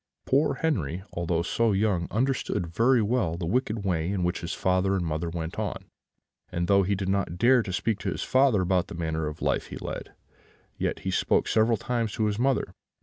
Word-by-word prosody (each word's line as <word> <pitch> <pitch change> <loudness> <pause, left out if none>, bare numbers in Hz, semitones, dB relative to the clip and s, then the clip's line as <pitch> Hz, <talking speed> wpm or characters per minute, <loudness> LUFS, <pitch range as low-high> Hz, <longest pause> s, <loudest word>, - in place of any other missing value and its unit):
"Poor 140 +4 +2
Henri, 95 - -1
although 85 -1 0
so 115 +4 +1
young, 95 -4 +1
understood 125 -5 0
very 115 +8 +3
well 105 -7 0
the 85 - -3
wicked 110 +1 -1
way 85 -3 0
in 95 -2 -1
which 90 +1 -1
his 85 - -4
father 95 +1 +1
and 90 -3 -1
mother 80 +1 -2
went 85 0 -5
on; - - -3 0.7
and 85 0 -1
though 100 +1 +5
he 100 +1 +1
did 95 -1 -3
not 95 -3 -1
dare 125 +5 +5
to 100 - -5
speak 105 +3 -1
to - - -2
his - - -3
father 130 -7 +3
about 90 -1 +1
the - - -8
manner 80 -2 -2
of 75 0 -6
life - - 0
he - - -7
led, - - -6 0.6
yet - - -2
he 95 - -2
spoke - - +2
several 110 +1 +3
times 115 -1 -2
to 110 - 0
his 105 0 -1
mother. 135 +1 +1
95 Hz, 205 wpm, -27 LUFS, 85-115 Hz, 0.7 s, though